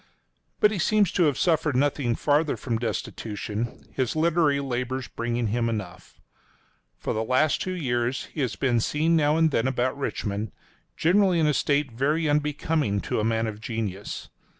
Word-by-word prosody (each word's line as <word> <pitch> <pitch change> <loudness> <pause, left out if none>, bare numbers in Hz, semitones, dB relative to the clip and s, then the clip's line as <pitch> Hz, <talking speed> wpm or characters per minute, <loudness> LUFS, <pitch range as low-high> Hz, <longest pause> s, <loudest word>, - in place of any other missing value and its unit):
But 210 - +5
he 205 - -2
seems 205 +1 +3
to 175 - +3
have 145 -3 +1
suffered 160 -4 +2
nothing 130 -3 +1
farther 150 +3 +1
from 115 -4 -2
destitution, 110 -1 -4
his 130 0 -1
literary 155 -3 +3
labors 130 -1 -3
bringing 120 -1 -2
him 115 +2 0
enough. 100 -5 -6 0.8
For - - -3
the 110 - -1
last 130 +6 +2
two 185 0 -2
years 125 -5 -1
he 155 - -3
has 130 - -1
been 125 -4 +1
seen 155 +8 +1
now 150 -1 +3
and 160 -1 +3
then 115 -1 +1
about 130 0 0
Richmond, 105 - -3 0.4
generally 185 +1 +3
in 160 - +3
a 150 - +3
state 140 -1 +1
very 150 +7 0
unbecoming 150 -6 0
to - - -2
a - - 0
man 115 0 +1
of 110 -1 -5
genius. 105 -4 -4
135 Hz, 170 wpm, -26 LUFS, 115-155 Hz, 0.8 s, But